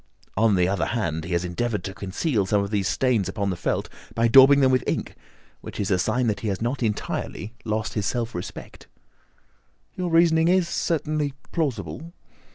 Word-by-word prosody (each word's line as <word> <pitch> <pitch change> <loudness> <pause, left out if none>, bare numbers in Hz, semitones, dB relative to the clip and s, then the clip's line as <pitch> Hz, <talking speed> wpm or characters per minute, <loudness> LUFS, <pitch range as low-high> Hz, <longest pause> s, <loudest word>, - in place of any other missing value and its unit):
On 110 0 +3
the 90 -1 +3
other 95 0 0
hand, 85 -9 -2
he 85 - -4
has 85 +1 0
endeavoured 105 +2 -2
to 95 0 -5
conceal 100 - -1
some 100 0 +2
of 100 - -5
these 100 -2 0
stains 115 -1 +1
upon 100 -1 -2
the - - -2
felt - - -2 0.3
by 115 0 +3
daubing 135 +4 +8
them 130 -1 +4
with 130 -1 +2
ink, - - -2 0.5
which - - -9
is 100 -1 -1
a 90 - +3
sign 120 +7 +1
that 105 -3 0
he 110 - -4
has 95 -3 -1
not 120 +4 -2
entirely 110 0 -3
lost 110 0 -2
his 105 -2 -1
self 120 +1 -2
respect." 90 - -8 1.1
"Your 180 -1 -3
reasoning 165 -1 +4
is 180 -1 +3
certainly 155 -4 -1 0.2
plausible." 140 - -3
110 Hz, 185 wpm, -24 LUFS, 100-135 Hz, 1.1 s, daubing